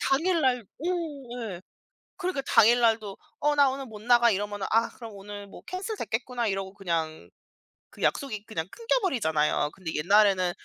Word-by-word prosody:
당일날 270 -5 +2
어 265 - -14 0.7
예 175 - -9 0.6
그러니까 365 -6 -1
당일 235 +3 +6
날도 220 -4 +2 0.2
"어 295 0 +2
나 285 -2 +5
오늘 270 0 -4
못 215 -3 -10
나가." 240 0 +5
이러면은 205 0 -2
'아 225 +1 +3
그럼 230 -2 -9
오늘 205 +1 -9
뭐 - - -12
캔슬됐겠구나.' 255 - -3
이러고 195 -1 -2
그냥 165 -5 -3 0.6
그 - - -14
약속이 215 -7 -1
그냥 170 -6 -4
끊겨버리잖아요. 230 - +1
근데 180 -4 -6
옛날에는 190 +1 +4
220 Hz, 340 characters per minute, -27 LUFS, 195-265 Hz, 0.7 s, 당일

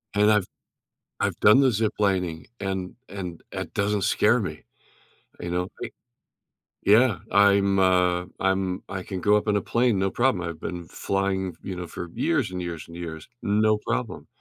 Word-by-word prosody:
And 105 +1 +5
I've 105 -3 +3 0.7
I've - - -1
done 105 +5 +7
the 135 - +5
ziplining, 100 -7 0
and 95 -2 -3
and 90 -4 -7
that - - -5
doesn't 100 0 0
scare - - +3
me. - - -4 0.8
You 85 - -5
know, 90 +1 -1 0.2
i - - -4 0.9
Yeah. 110 0 +5
I'm, 100 -1 +4
uh, 90 -1 +3
I'm 95 -1 0
I 95 -2 -4
can 95 -1 -5
go 105 +2 +4
up 105 - -3
in 105 - +2
a 100 - +2
plane, 120 -2 +1
no 95 0 +1
problem, 120 -9 +1
I've 85 -2 -6
been 85 0 -6
flying, 95 +1 -2
you 95 - -5
know, 90 -1 -6
for 85 +1 -7
years - - 0
and 90 -1 -4
years 85 -3 -6
and 85 0 -10
years, 80 -2 -7
no 105 +1 +2
problem. - - -3
95 Hz, 170 wpm, -25 LUFS, 90-105 Hz, 0.9 s, done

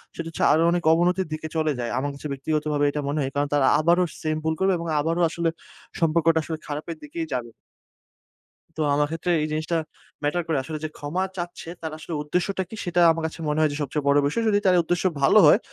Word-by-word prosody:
সেটা 165 - -5
হচ্ছে 165 - -3
আরো 155 - +4
অনেক 175 0 0
অবনতির 180 +3 +2
দিকে 155 0 -4
চলে 155 -1 +1
যায়। 120 -1 -2
আমার 140 +2 -1
কাছে 140 +2 -7
ব্যক্তিগতভাবে 150 +1 -1
এটা 150 +1 -3
মনে 145 +2 -1
হয়। 135 -1 -2
কারণ, 145 +1 +1
তারা 145 -2 +3
আবারো 170 +3 +3 0.2
সেম 155 0 -1
ভুল 160 0 +1
করবে 190 0 +3
এবং 170 0 -5
আবারো 165 +3 0
আসলে 170 0 -1 0.5
সম্পর্কটা 165 0 +3
আসলে 160 0 -4
খারাপের 150 +3 -5
দিকেই 160 +3 -4
যাবে। 120 -2 -3 1.3
তো - - -1
আমার 145 0 +2
ক্ষেত্রে 165 +2 -1
এই 155 - 0
জিনিসটা 155 +2 -1 0.5
ম্যাটার 170 +4 0
করে। 160 -3 +1
আসলে 155 +3 -5
যে - - -3
ক্ষমা 160 +6 -2
চাচ্ছে 175 -1 -6
তার 160 -1 -4
আসলে 160 +2 -7
উদ্দেশ্যটা 180 +5 -1
কি? - - -8
সেটা 175 0 +1
আমার 165 0 -3
কাছে 160 - -10
মনে 150 +1 0
হয় 155 - +4
যে - - -4
সবচেয়ে 145 +1 -2
বড় 140 0 +5
বিষয়। 230 +11 -1
যদি 205 -1 +3
তার 185 -1 +5
উদ্দেশ্য 175 +1 -1 0.2
ভালো 140 +10 +6
হয়, - - +7
160 Hz, 220 wpm, -24 LUFS, 150-170 Hz, 1.3 s, হয়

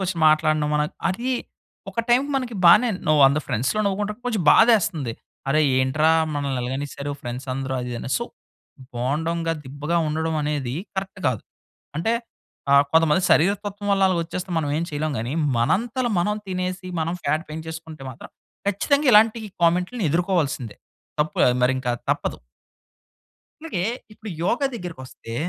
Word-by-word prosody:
నోటికొచ్చిన 185 -2 -2
మాటలనడం 155 -1 +3
మన 150 - +3 0.3
అదీ 235 +8 -2 0.6
ఒక 230 - -1
టైమ్‌కి 265 +4 +3
మనకి 250 -3 -3
బానేన్ 200 +4 +6
ను - - +5
100 140 +2 +5
ఫ్రెండ్స్‌లో 130 - 0
నవ్వుకుంటే, 205 +2 -1
కొంచెం 220 -7 0
బాధేస్తంది. 185 - +4 0.4
అరె 155 +3 +3 0.2
ఏంట్రా! 145 +5 +3 0.2
మనల్నిలగనేశారు 140 +1 -3
ఫ్రెండ్సందరూ 130 +2 -4
అది 125 0 -5
ఇదని. 120 +2 -5
సో, 235 - -3 0.7
బోండాంగా, 160 +7 -1
దిబ్బగా 145 +5 -3
ఉండడవనేదీ 150 -4 -1 0.2
కరక్ట్ 190 0 -4
గాదు. 125 -5 0 0.5
అంటే, 220 +8 +1 0.6
ఆహ్, 140 0 +7
కొంతమంది 160 +2 +4
శరీర 180 +6 +5
తత్వం 205 0 -5
వల్ల 195 0 +2
అలగొచ్చేస్తే 180 +1 -2
మనవేం 150 +2 -1
చెయలేం 150 0 -2
గానీ, 120 +3 -3 0.3
మనంత‌ల 235 - +1
మనం 210 +4 +1
తినేసి, 185 0 -3
మనం 165 +2 -1
ఫ్యాట్ 155 +2 0
పేంచేసుకుంటే 160 -2 -7
మాత్రం 125 - -12 0.4
ఖచ్చితంగా 280 +8 +2
ఇలాంటీ 220 +1 +5 0.2
కామెంట్‌లుని 180 +4 +2
ఎదురుకోవాల్సిందే. 160 - 0 0.4
తప్పే, 150 0 +2 0.2
మరింకా 130 -1 +1 0.2
తప్పదు. - - -1 1.2
అలాగే 245 - -3 0.3
ఇప్పుడు 215 0 -9
యోగ 235 +8 +1
దగ్గరికి 180 - -6
వస్తే, 115 -2 -10
160 Hz, 130 wpm, -23 LUFS, 140-195 Hz, 1.2 s, ఆహ్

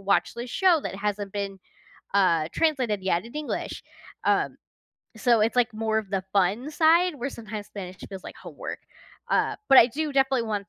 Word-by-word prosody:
watch 200 +3 +1
this 240 +1 -6
show 360 -2 +4
that - - -4
hasn't 205 0 -3
been, 200 -1 -4 0.6
uh, 170 -6 +3
translated 255 -11 0
yet 175 -2 +1
in 235 +5 -12
English," 300 -1 -4 0.4
um, - - +1 0.6
so 235 -1 +3
it's, 225 +3 +1
like, 240 -2 +2
more 220 0 0
of 210 -3 -6
the 195 -2 -1
fun 205 +9 +1
side 330 +2 +4
where 260 +2 -3
sometimes 215 -2 -7
Spanish 190 -3 -8
feels 190 -2 -8
like - - -10
homework. - - -7 0.5
Uh, - - +1
but 270 - +9
I 230 - +9
do 300 +4 -3
definitely 265 -2 +2
want 205 -2 -3
220 Hz, 180 wpm, -26 LUFS, 200-265 Hz, 0.6 s, but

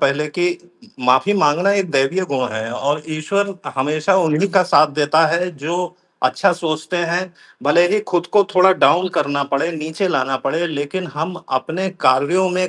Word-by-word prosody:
पहले 140 +2 +1
कि 175 +4 0
उ 175 - -19
माफ़ी 130 +11 +3
माँगना 175 +2 +2
एक 195 -3 -1
दैवीय 140 +7 +1
गुण 130 -3 0
है 110 +1 -4
और 145 +4 -2
ईश्वर 195 +6 -2 0.2
हमेशा 155 +7 +1
उन्हीं 170 +1 +1
का 190 - +5
साथ 160 -4 +4
देता 155 +2 +3
है 170 +3 -1
जो 155 +5 -3 0.5
अच्छा 130 +10 +2
सोचते 160 0 -3
हैं, 175 +1 -1 0.4
भले 170 +5 +4
ही 210 +3 +1
खुद 175 -1 0
को 205 - +6
थोड़ा 185 +1 +6
डाउन 185 0 +3
करना 140 -1 0
पड़े, 140 +4 -1
नीचे 160 +4 -3
लाना 135 -5 0
पड़े 160 +5 0
लेकिन 155 +4 -4
हम 160 +4 -3
अपने 160 +8 -2
कार्यों 145 +9 +3
में 180 0 0
160 Hz, 175 wpm, -18 LUFS, 145-185 Hz, 0.5 s, को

